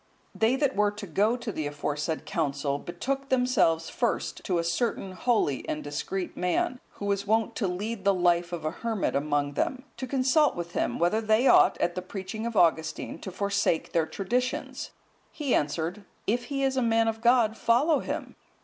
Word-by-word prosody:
They 225 +3 +2
that 275 -1 +1
were 210 0 +3
to 205 0 -7
go 205 +7 +1
to 235 -2 -4
the 155 -6 -3
aforesaid 150 +2 -3
council, 140 0 -1
betook 270 - -4
themselves 250 -11 +2
first 240 -1 -1
to 180 - +1
a 170 - +1
certain 190 +3 -1
holy 185 - +1
and 150 - -2
discreet 180 +6 -4
man, 180 +7 0
who 200 - -7
was 200 0 -1
wont 220 +1 +1
to 205 - 0
lead 200 +3 -3
the 200 - +5
life 175 -2 +2
of 170 -3 -5
a 155 - 0
hermit 225 -4 -2
among 145 0 0
them, 255 - -1
to 260 - -4
consult 275 +3 +3
with 170 0 -5
him, - - -1
whether 175 +6 +2
they 220 +3 +3
ought, - - +6
at 175 - +1
the 185 - -3
preaching 195 +4 -5
of 230 -2 -4
Augustine, 160 -3 +1
to 190 - -7
forsake 200 -3 0
their 165 -1 +1
traditions. 245 +6 -2 0.4
He 285 -5 -1
answered, 160 +7 -1 0.2
"If 240 +4 0
he 275 +1 -2
is 265 0 +1
a - - +3
man 225 -1 +3
of 225 0 -2
God, 235 -2 +4
follow 275 +8 +3
him." - - -5
200 Hz, 185 wpm, -27 LUFS, 170-240 Hz, 0.4 s, ought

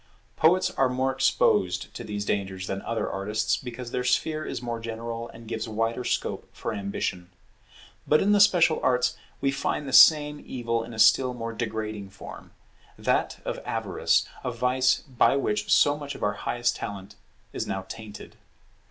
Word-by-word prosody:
Poets 180 +4 +3
are 135 -1 +2
more 130 +1 0
exposed 90 -7 +1
to - - -7
these 105 -1 -4
dangers 95 -2 -2
than 95 +1 -4
other 115 -1 -2
artists, 105 +3 -1
because 125 -1 -7
their 125 - -1
sphere 155 +5 0
is - - -4
more 120 -1 -4
general 115 +1 -5
and 115 0 -13
gives 115 0 -4
wider 115 +3 -1
scope - - -2
for - - -5
ambition. 100 -3 -3 0.8
But 150 - +5
in 205 - +2
the 205 - +5
special 175 -5 +5
arts 125 0 +2 0.3
we 135 - +2
find 140 +1 -2
the 135 - -5
same 150 -1 +7
evil 115 -2 -2
in 115 0 -9
a - - -10
still 125 +3 +5
more 115 -1 -5
degrading 110 -3 -4
form; 100 +1 -11 0.5
that - - -1
of - - -3
avarice, - - 0 0.2
a - - -1
vice 130 0 +1
by 130 -1 +2
which 105 -6 -1
so 145 - +5
much 145 -1 -6
of - - -8
our 105 - +1
highest 120 +2 -1
talent 100 -1 -7 0.4
is - - -3
now 95 0 -3
tainted. 105 -2 -10
115 Hz, 170 wpm, -26 LUFS, 105-130 Hz, 0.8 s, same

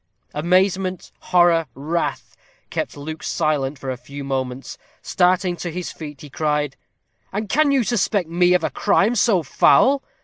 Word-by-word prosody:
Amazement, 185 +3 0
horror, 175 -3 +3
wrath, 160 +5 -3 0.4
kept - - -3
Luke 155 +2 -7
silent 150 -3 -1
for 130 0 -5
a 130 - -5
few 140 +3 -9
moments. 130 -1 -4 0.2
Starting 180 0 +2
to 175 - -5
his 180 +1 -5
feet, 150 -4 -9
he 150 - -10
cried: 150 -2 -1 0.6
"And 210 +2 -3
can 300 +7 +3
you 270 -3 +3
suspect 205 -5 0
me 175 +2 +3
of 180 - +1
a - - -1
crime 210 +2 +2
so 205 -6 +2
foul? 270 - +4
170 Hz, 150 wpm, -21 LUFS, 145-190 Hz, 0.6 s, foul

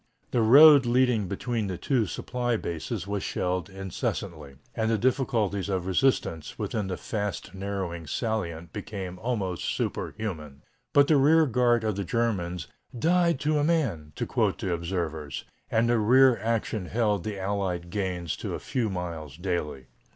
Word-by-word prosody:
The 120 - +2
road 140 +3 +8
leading 120 -4 +2
between 110 +3 -2
the 95 -2 -4
two 120 +2 +1
supply 120 +5 -2
bases 85 +2 -4
was 100 0 -2
shelled 90 -1 -2
incessantly, 90 -5 -4 0.2
and 110 -1 0
the 115 - +2
difficulties 110 -6 0
of 95 -2 -1
resistance 95 - 0
within 105 -3 -2
the 95 -1 -3
fast 105 -4 -4
narrowing 95 -4 -4
salient 85 - -3
became 95 -3 -6
almost 95 -6 -2
superhuman. 75 -10 -4 0.3
But 140 0 +6
the 155 - +5
rear 155 +4 +5
guard 120 -2 +2
of 110 -3 -1
the 100 - -1
Germans 90 - -1 0.3
"died 170 +1 +2
to 150 +1 +2
a - - +1
man," 125 - 0
to - - -2
quote - - 0
the 90 - -2
observers, 85 -4 -3 0.3
and 115 +1 +2
the 120 -1 +3
rear 130 +4 +6
action 110 -3 -1
held 105 -2 0
the 105 -2 -4
Allied 95 -3 -2
gains 90 -4 -2
to - - -4
a - - -5
few 120 -4 -1
miles 85 -6 -5
daily. 85 -7 -3
100 Hz, 155 wpm, -27 LUFS, 90-120 Hz, 0.3 s, road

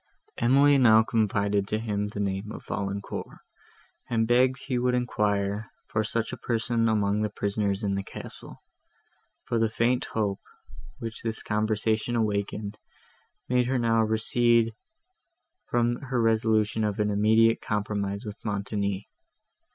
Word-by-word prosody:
Emily 140 +4 +5
now 110 -3 +6
confided 100 -2 +1
to 110 - 0
him 105 -2 -2
the 105 0 -6
name 100 +1 -2
of - - -9
Valancourt, 100 0 -4 0.7
and 115 -1 +1
begged 125 +2 +3
he 135 -2 -2
would 125 0 +1
enquire 105 -3 0 0.2
for 110 - -1
such 115 +1 -2
a - - -5
person 115 -1 0
among 105 -1 +1
the 105 - 0
prisoners 100 0 -1
in 100 -1 0
the 100 - -1
castle; 95 - -10 0.8
for 115 - -1
the 115 -1 +2
faint 120 +3 +1
hope, 105 -3 -2 0.6
which 115 0 -5
this 115 -1 -4
conversation 110 +2 0
awakened, 105 -1 -2 0.7
made 125 -1 +2
her 130 +1 +1
now 115 -1 +2
recede 115 +1 +2 1.0
from 120 0 +1
her 130 -3 -3
resolution 110 -1 +2
of 105 -2 -1
an 105 0 +1
immediate 110 +2 +4
compromise 100 0 -2
with 105 +1 -8
Montoni. 100 -1 -2
110 Hz, 135 wpm, -27 LUFS, 105-115 Hz, 1.0 s, now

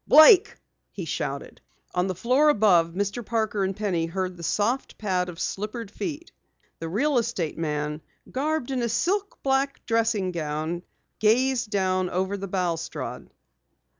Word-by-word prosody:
"Blake!" 345 +7 +8 0.3
he - - -6
shouted. - - -4 0.3
On 180 +1 +1
the 185 - -2
floor 255 - +3
above 195 - +4
Mr. 205 +5 -2
Parker 220 -2 0
and 190 0 -1
Penny 180 -6 0
heard 185 +1 -3
the 175 - -11
soft 215 +9 -1
pad 185 -4 0
of 170 - -9
slippered 210 +1 -4
feet. 325 +6 -5 0.5
The 165 - -4
real 260 - +2
estate 220 -9 -2
man, 150 -1 -2 0.3
garbed 285 0 -1
in 260 - 0
a 235 - +1
black - - -4
silk 390 - 0 0.5
dressing 225 -5 +1
gown, 160 +1 -3 0.4
gazed 240 +2 +3
down 185 -3 +1
over 190 +2 -1
the 195 0 -5
balustrade. 175 -3 -3
200 Hz, 145 wpm, -26 LUFS, 180-240 Hz, 0.5 s, Blake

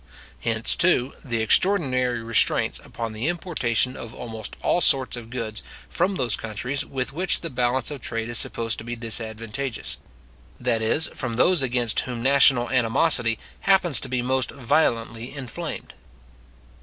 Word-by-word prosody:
Hence, 115 -1 +1
too, 140 -7 +3
the 115 -4 -2
extraordinary 130 - +2
restraints 115 0 +2
upon 115 -2 -6
the 110 +6 -3
importation 135 - -1
of 115 0 -9
almost 110 -2 -6
all 175 - +2
sorts 135 -5 +6
of 115 -2 -9
goods 115 -3 -4 0.3
from 190 +3 0
those 120 - 0
countries 125 +5 -3
with 130 0 -4
which 180 +4 +1
the 165 - -6
balance 125 +1 0
of 140 -3 -7
trade 115 -1 -3
is 120 0 +1
supposed 115 -1 -1
to - - -8
be 120 +1 -5
disadvantageous; 115 +2 -4 0.6
that 120 -2 0
is, 130 +8 +2
from 120 -4 -3
those 175 +6 +3
against 120 -3 0
whom 120 -2 -4
national 130 -3 +4
animosity 125 -1 +2 0.2
happens 190 -7 +3
ta - - -2
be 125 -1 -1
most 130 0 0
violently 120 -2 -1
inflamed. 130 -6 -6
125 Hz, 150 wpm, -24 LUFS, 115-135 Hz, 0.6 s, sorts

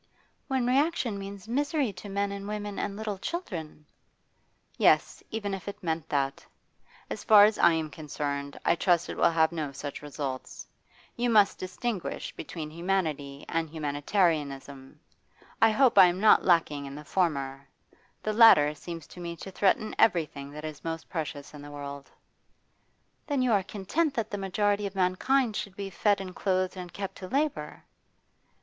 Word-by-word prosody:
'When 265 -3 0
reaction 255 -4 +1
means 195 +1 -8
misery 285 - 0
to 190 +3 -9
men 200 0 -1
and 200 0 -6
women 210 -1 -4
and 200 - -3
little 210 -3 -4
children?' 170 - -5 0.9
'Yes, - - +3
even 205 -2 -3
if 195 0 -6
it 200 - -7
meant 160 -2 -2
that. 135 -1 -1 0.7
As - - -4
far 210 -2 +8
as 215 0 +1
I 170 - +6
am 160 -2 -2
concerned, 145 -2 -4
I - - +5
trust 175 -1 +2
it - - -4
will - - +4
have 160 -1 +3
no 155 -4 -3
such 140 +1 -6
results. 140 -3 -6 0.5
You 240 0 0
must 210 -3 +4
distinguish 185 +1 -4
between 155 -3 -6
humanity 155 -5 -2
and 165 -1 -1
humanitarianism. 145 -3 -1 0.6
I 225 - +7
hope 250 +3 +4
I 180 - +10
am 175 +1 -1
not 215 +1 +6
lacking 155 -5 +2
in 140 - -8
the 150 +1 -9
former; 140 -6 -1 0.5
the 215 - -1
latter 210 -10 +7
seems 165 +1 -8
to - - -13
me 170 -1 -5
to 190 +3 -9
threaten 200 +3 +1
everything 150 -8 +2
that 150 +1 -7
is 155 -2 -7
most 165 0 -5
precious 150 -4 -5
in 150 - -10
the 145 - -10
world.' 140 -1 -8 1.2
'Then 285 -3 +1
you 250 - +2
are 205 -3 +4
content 215 - -1
that 220 -2 -2
the 205 - -3
majority 205 +1 0
of 195 - -9
mankind 210 +6 +2
should 200 -3 -4
be 195 -1 -5
fed 205 +2 +2
and 185 -2 -7
clothed 185 -1 0
and 180 -2 -7
kept 195 +1 -6
to 185 - -7
labour? 270 - -2
185 Hz, 170 wpm, -28 LUFS, 150-210 Hz, 1.2 s, I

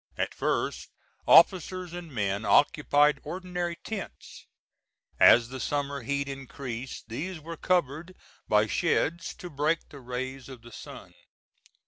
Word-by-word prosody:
At - - -1
first, - - -2 0.4
officers 185 -1 +5
and 175 -2 -8
men 100 -3 -1
occupied 145 +2 +4
ordinary 180 -1 -4
tents. 205 +1 -8 0.7
As 115 0 +7
the 130 0 -7
summer 140 0 -2
heat 140 +3 -2
increased 135 -3 -7
these 160 +10 -5
were 165 +2 -8
covered 170 +1 -1 0.3
by - - +4
sheds 170 +2 0
to 180 - -9
break 155 +1 -1
the 140 - -11
rays 130 +1 -6
of 125 -3 -11
the 120 - -13
sun. - - -11
145 Hz, 125 wpm, -28 LUFS, 130-170 Hz, 0.7 s, As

